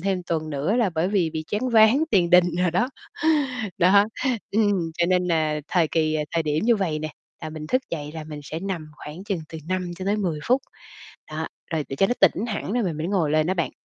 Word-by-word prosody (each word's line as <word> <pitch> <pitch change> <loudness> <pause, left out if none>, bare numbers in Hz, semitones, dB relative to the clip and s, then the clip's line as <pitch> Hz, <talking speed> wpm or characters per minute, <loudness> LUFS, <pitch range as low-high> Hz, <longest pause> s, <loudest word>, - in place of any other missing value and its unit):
thêm 190 0 -1
tuần 160 -2 -2
nữa, 150 +10 0
là 230 -6 +2
bởi 165 +3 +1
vì 190 -5 +1
bị 155 0 -4
choáng 220 +5 0
váng 225 +6 +6
tiền 175 -4 +3
đình 180 0 +7
đồ 180 -1 +2
đó. 240 +9 +1 0.9
Đó, 195 +3 +6 0.5
ừm, 200 -6 +1
cho 170 - +3
nên 180 0 +2
nà 155 -3 +1
thời 170 -4 +2
kỳ, 155 -1 +1
à 150 -1 0
thời 165 - +2
điểm 150 +4 0
như 235 0 +4
vầy 170 -7 -1
nè, 155 0 -4 0.3
là 155 - -4
mình 155 -1 -7
thức 255 +10 +1
dậy 150 -3 -4
là 160 -1 -6
mình 150 -1 -8
sẽ 155 +3 -5
nằm 185 -5 -4
khoảng 155 +6 -9
chừng 195 -5 -2
từ 160 - -7
5 185 -1 -1
cho 185 - -6
tới 205 +2 +1
10 180 -7 -1
phút. 255 +3 +3 0.7
Đó, - - -3 0.2
rồi 160 -2 0
để 135 - -4
cho 195 - +3
nó 245 - +1
tỉnh 195 +3 +4
hẳn 210 -1 -3
rồi 245 - +1
mình 170 -6 -2
mới 160 +2 -2
ngồi 180 -6 +1
lên 155 0 +2
đó 185 - +2
bạn. 170 -3 -1
175 Hz, 245 wpm, -24 LUFS, 155-200 Hz, 0.9 s, đình